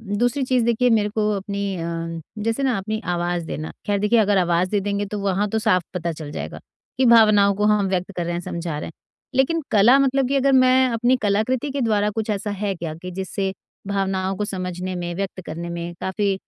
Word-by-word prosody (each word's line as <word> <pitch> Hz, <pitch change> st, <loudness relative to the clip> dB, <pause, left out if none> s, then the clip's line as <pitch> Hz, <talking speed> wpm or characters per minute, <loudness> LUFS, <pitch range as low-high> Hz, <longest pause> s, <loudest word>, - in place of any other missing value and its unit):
दूसरी 235 Hz, +6 st, 0 dB
चीज़ 255 Hz, -2 st, +2 dB
देखिए 235 Hz, +1 st, +2 dB
मेरे 210 Hz, -2 st, +3 dB
को 210 Hz, 0 st, 0 dB
अपनी 200 Hz, -1 st, -3 dB
अम, 165 Hz, 0 st, -4 dB, 0.2 s
जैसे 225 Hz, +5 st, -1 dB
ना 255 Hz, -5 st, +2 dB
अपनी 215 Hz, +3 st, -3 dB
आवाज़ 175 Hz, -1 st, -1 dB
देना। 155 Hz, 0 st, -5 dB
खैर 205 Hz, -1 st, +1 dB
देखिए 210 Hz, +3 st, +3 dB
अगर 205 Hz, -2 st, +3 dB
आवाज 175 Hz, 0 st, +2 dB
दे 205 Hz, -1 st, +1 dB
देंगे 200 Hz, +1 st, -2 dB
तो 210 Hz, +1 st, -5 dB
वहाँ 200 Hz, +1 st, 0 dB
तो 220 Hz, -, 0 dB
साफ 185 Hz, -4 st, +2 dB
पता 170 Hz, -1 st, -2 dB
चल 150 Hz, -2 st, -8 dB
जाएगा -, -, -6 dB, 0.4 s
कि 260 Hz, -, +3 dB
भावनाओं 215 Hz, -4 st, +6 dB
को 210 Hz, -, -1 dB
हम 210 Hz, -2 st, +3 dB
व्यक्त 185 Hz, +1 st, -2 dB
कर 175 Hz, -, -1 dB
रहे 175 Hz, -, -2 dB
हैं, 170 Hz, -, -2 dB
समझा 170 Hz, -3 st, -4 dB
रहे -, -, -5 dB
हैं। -, -, -11 dB, 0.4 s
लेकिन 310 Hz, +5 st, +2 dB
कला 225 Hz, +6 st, +6 dB
मतलब 270 Hz, -1 st, +2 dB
कि 280 Hz, -, +1 dB
अगर 275 Hz, 0 st, +3 dB
मैं 255 Hz, 0 st, +5 dB
अपनी 240 Hz, +2 st, +2 dB
कलाकृति 220 Hz, +7 st, 0 dB
के 275 Hz, 0 st, -3 dB
द्वारा 210 Hz, -3 st, +2 dB
कुछ 220 Hz, 0 st, -3 dB
ऐसा 205 Hz, 0 st, -2 dB
है 205 Hz, -1 st, -2 dB
क्या 165 Hz, -2 st, -5 dB
कि 180 Hz, -, -6 dB
जिससे 190 Hz, +1 st, -3 dB, 0.3 s
भावनाओं 195 Hz, -1 st, -1 dB
को 210 Hz, -, -1 dB
समझने 185 Hz, -1 st, -4 dB
में, 175 Hz, -1 st, -4 dB
व्यक्त 190 Hz, 0 st, -4 dB
करने 170 Hz, +2 st, -5 dB
में 170 Hz, 0 st, -5 dB
काफ़ी, 195 Hz, +1 st, 0 dB
200 Hz, 220 wpm, -22 LUFS, 180-225 Hz, 0.4 s, भावनाओं